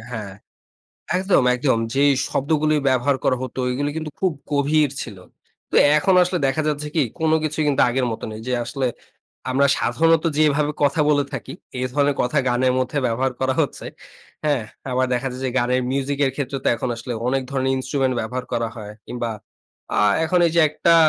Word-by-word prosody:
হ্যাঁ। 105 -5 -6 0.8
একদম, 190 -5 +3
একদম। 125 -2 +1 0.2
যে 135 - +1 0.3
শব্দগুলো 155 +2 +1 0.2
ব্যবহার 130 +1 +2
করা 130 - +3
হতো, 130 0 -6
এগুলো 145 +3 -1
কিন্তু 155 -1 -4
খুব 185 -2 +2 0.2
গভীর 145 +1 +2
ছিল। 105 -5 -8 0.5
তো - - -7 0.2
এখন 185 +5 +3
আসলে 180 0 0
দেখা 145 +4 0
যাচ্ছে 150 0 -2
কি? 155 - +3 0.2
কোন 160 -1 +1
কিছুই 155 0 -1
কিন্তু 140 -1 +3
আগের 125 +1 0
মত 110 - -6
নেই। 110 - -7
যে 125 - -2
আসলে 135 +2 -2 0.6
আমরা 140 +2 +3
সাধারণত 165 0 +2
যেভাবে 150 -1 +2
কথা 145 +2 +2
বলে 145 -1 +3
থাকি, 135 - -6 0.3
এ - - -2
ধরনের 145 0 +2
কথা 125 +4 +1
গানের 125 +1 +2
মধ্যে 130 +3 -1
ব্যবহার 125 +3 0
করা 130 0 +1
হচ্ছে। - - -2 0.6
হ্যাঁ, 145 -5 +1 0.3
আবার 130 +1 +1
দেখা 125 +2 -2
যায় 125 - -7
যে 130 - 0
গানের 125 +1 +1
মিউজিকের 140 0 0
ক্ষেত্রে 140 -1 -3
তো - - +3
এখন 125 - -3
আসলে 120 +1 -6 0.2
অনেক 135 +1 +1
ধরনের 130 -1 0
instrument 130 0 0
ব্যবহার 125 +3 -4
করা 115 -1 0
হয়। 105 -2 -8
কিংবা 120 -1 -3 0.7
আ - - +2 0.3
এখন 180 +2 +2
এইযে 170 0 +2
একটা 170 +2 +3
135 Hz, 180 wpm, -22 LUFS, 125-150 Hz, 0.8 s, একদম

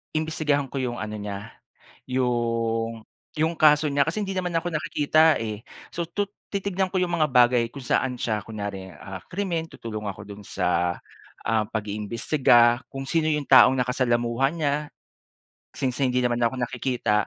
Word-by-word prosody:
imbestigahan 155 -3 0
ko 140 - -3
yung 125 -2 -2
ano 105 0 -5
niya, 100 0 -6 0.6
yung 115 -3 -1 0.3
yung 160 +2 +1
kaso 155 -2 +5
niya 140 +2 +2
kasi 210 +5 -1
hindi 195 - -4
naman 185 -2 -2
ako 170 +1 -1
nakikita 155 +1 +3
eh. 110 -2 -4 0.3
So, 170 -1 -3
tu 205 +4 -1 0.2
titignan 195 -1 -1
ko 190 - -4
yung 180 -1 +1
mga 155 - +4
bagay 125 -2 +4
kung 135 +2 -10
saan 125 +1 0
siya, 110 -3 -1
kunyari, 100 -2 -6
ah, 95 -1 -8
krimen. 170 -4 -2
Tutulong 110 -6 -6
ako 100 +1 -7
dun 100 0 -10
sa, 90 -3 0 0.5
ah, 110 0 +1
pag-iimbestiga, 120 +3 +2
kung 135 0 -6
sino 155 +3 +1
yung 150 -2 0
taong 130 0 +7
nakasalamuha 125 0 +1
niya 145 -3 +1 1.0
since 130 -3 -2
hindi 125 -2 +1
naman 120 -1 +1
ako 120 +1 +1
nakikita. 120 -3 0
125 Hz, 155 wpm, -25 LUFS, 115-155 Hz, 1.0 s, taong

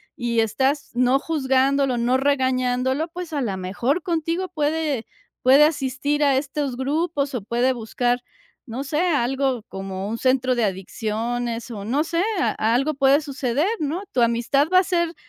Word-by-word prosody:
y 235 -2 -1
estás, 265 +6 0
no 250 +2 +3
juzgándolo, 270 -3 +1
no 245 +2 +2
regañándolo, 260 +1 +1
pues, 350 -2 -7
a 285 - -1
la 210 -6 -2
mejor 235 - -1
contigo 335 +2 -1
puede 300 -4 -1 0.4
puede 270 +3 +7
asistir 290 0 0
a 275 -2 +4
estos 275 -1 -2
grupos 285 +1 -1
o 240 - -2
puede 240 +4 +1
buscar, 245 +1 -1 0.5
no 250 +4 -4
sé, 295 +3 -2
algo 270 -6 0
como 195 0 -5
un 225 - -3
centro 260 0 +2
de 240 -2 0
adicciones 230 +5 -3
o 205 -3 -6
no 275 +7 +1
sé, 335 +2 -1 0.2
a - - +1 0.2
algo 275 +5 +1
puede 275 +2 +4
suceder, 280 +1 -1
¿no?, 315 +6 -2
tu 245 - +1
amistad 235 +5 +2
va 370 - +7
a 375 - +2
ser 340 -2 0
265 Hz, 160 wpm, -23 LUFS, 240-295 Hz, 0.5 s, puede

